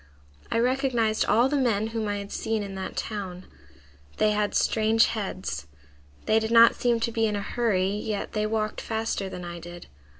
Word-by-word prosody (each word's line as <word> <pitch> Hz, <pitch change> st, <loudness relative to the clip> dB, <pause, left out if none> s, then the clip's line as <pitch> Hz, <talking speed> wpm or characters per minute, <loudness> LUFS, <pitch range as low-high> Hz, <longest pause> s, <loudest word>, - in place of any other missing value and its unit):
I -, -, +1 dB
recognized 240 Hz, -3 st, +1 dB
all 235 Hz, +4 st, +4 dB
the 285 Hz, -, -1 dB
men 225 Hz, -6 st, +1 dB
whom 225 Hz, -1 st, -3 dB
I 205 Hz, -, -1 dB
had 200 Hz, 0 st, -7 dB
seen 220 Hz, -1 st, -2 dB
in 200 Hz, -1 st, -6 dB
that 190 Hz, 0 st, -6 dB
town. 190 Hz, -4 st, -5 dB, 0.7 s
They 215 Hz, -, +3 dB
had 210 Hz, 0 st, 0 dB
strange 220 Hz, +1 st, +3 dB
heads. 185 Hz, -, -4 dB, 0.6 s
They 220 Hz, -, +4 dB
did 220 Hz, 0 st, -2 dB
not 230 Hz, 0 st, +7 dB
seem 240 Hz, -1 st, +1 dB
to 230 Hz, -, 0 dB
be 225 Hz, -1 st, +1 dB
in 210 Hz, -, -1 dB
a 205 Hz, -, -2 dB
hurry, 200 Hz, -5 st, 0 dB
yet 210 Hz, 0 st, -3 dB
they 215 Hz, 0 st, 0 dB
walked 215 Hz, -1 st, -2 dB
faster 220 Hz, -3 st, -2 dB
than 180 Hz, -1 st, -7 dB
I 170 Hz, 0 st, -6 dB
did. 175 Hz, +1 st, -10 dB
215 Hz, 190 wpm, -26 LUFS, 200-230 Hz, 0.7 s, not